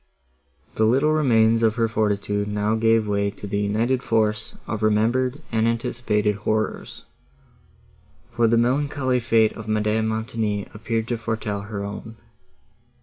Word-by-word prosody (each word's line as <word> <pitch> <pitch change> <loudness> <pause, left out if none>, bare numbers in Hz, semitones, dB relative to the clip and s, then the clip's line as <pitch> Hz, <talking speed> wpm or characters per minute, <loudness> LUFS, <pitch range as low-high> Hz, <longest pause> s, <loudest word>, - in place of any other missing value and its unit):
The 110 - +2
little 135 +7 +3
remains 115 -6 +3
of 110 -1 +2
her 115 -2 +1
fortitude 105 -1 -1
now 105 +1 0
gave 115 -1 +2
way 100 0 0
to 100 - -10
the 100 0 -2
united 115 +5 0
force 110 -2 0
of 110 -1 -4
remembered 120 +5 +1
and 110 0 +2
anticipated 105 -3 0
horrors, 110 +1 -3 1.3
for 120 -1 +2
the 115 +1 +3
melancholy 130 +1 +1
fate 115 -2 +2
of 115 -1 -9
Madame 110 +1 +1
Montoni 110 -2 -2
appeared 115 +1 -3
to 120 - -1
foretell 110 -3 -3
her 100 -1 -5
own. 105 +2 -7
110 Hz, 140 wpm, -23 LUFS, 105-115 Hz, 1.3 s, little